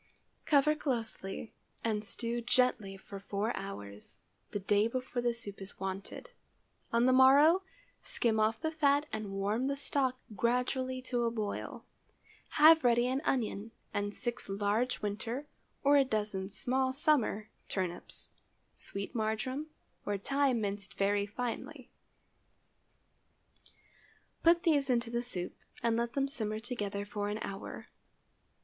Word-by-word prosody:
Cover 300 0 +5
closely 230 -8 -3 0.3
and 215 -2 0
stew 235 +3 -2
gently 245 -5 +2
for 195 +1 -9
four 205 +3 -2
hours, 105 - -7 0.3
the - - -2
day 205 +2 +3
before 255 0 -3
the 240 0 +2
soup 220 -4 -7
is 195 - -6
wanted. 195 - -5 0.6
On 235 +1 +3
the 255 - +5
morrow, 285 +7 +7 0.4
skim 225 -2 +1
off 220 +1 +2
the 315 -1 -1
fat 290 -2 +3
and 215 -2 -3
warm 205 +6 0
the 280 - 0
stock 275 -2 0 0.2
gradually 255 +3 0
to 245 -2 0
a - - +3
boil. 215 -3 -4 0.7
Have 315 +1 +8
ready 240 0 +4
an 260 +2 0
onion 225 -3 -1 0.2
and 205 0 -1
six 240 -3 -3
large 210 +5 0
winter 225 +7 -3 0.4
or 285 +1 +6
a 280 - +6
dozen 210 -6 -2
small 260 +6 +2
summer 260 -7 +2 0.2
turnips, 180 -3 -4 0.5
sweet 200 +4 -5
marjoram 235 +6 -1 0.4
or 205 -1 -1
thyme 275 +3 +1
minced 200 -2 -3
very 200 +1 +1
finely. 250 +5 -5 2.5
Put 335 +1 +5
these 290 -5 +3
into 235 -2 +1
the 235 0 0
soup 190 -8 -4 0.3
and 230 -1 +3
let 235 +1 -1
them 275 +1 +1
simmer 215 -6 -2
together 205 -4 -3
for 205 0 -3
an 210 - -2
hour. 195 0 -7
235 Hz, 135 wpm, -32 LUFS, 205-260 Hz, 2.5 s, Have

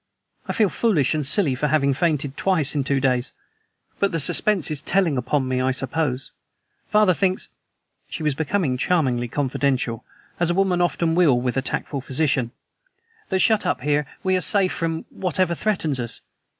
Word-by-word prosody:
I - - -2
feel 215 -3 +2
foolish 175 - +1
and 155 -1 -1
silly 145 +1 +2
for 135 +4 -1
having 140 -2 +2
fainted, 150 -2 -1
twice 170 -7 +1
in 145 -3 0
two 135 +1 0
days! 125 -2 0 0.7
But 200 - +1
the 165 - -1
suspense 185 +3 +1
is 150 -2 -1
telling 175 -3 +1
upon 130 +2 -1
me, 130 0 0
I 130 - +1
suppose. 135 0 -2 0.6
Father 210 -3 +4
thinks" 185 +1 -1 0.6
she 160 - -6
was 150 -2 +1
becoming 160 -2 -1
charmingly 130 -7 +1
confidential, 130 -3 -1 0.4
as 175 -1 +2
a 175 - +1
woman 190 -2 +2
often 170 -1 +1
will 160 -8 +4
with 125 0 -2
a 135 - +1
tactful 135 +1 -3
physician 130 -2 0 0.8
"that 190 - +1
shut 220 -2 +3
up - - -1
here 145 +1 0 0.2
we 185 -1 +2
are 185 - 0
safe 190 +3 +3
from 165 -1 -2
whatever 180 -1 0
threatens 165 -8 -1
us." 120 -1 -2
150 Hz, 175 wpm, -22 LUFS, 135-180 Hz, 0.8 s, Father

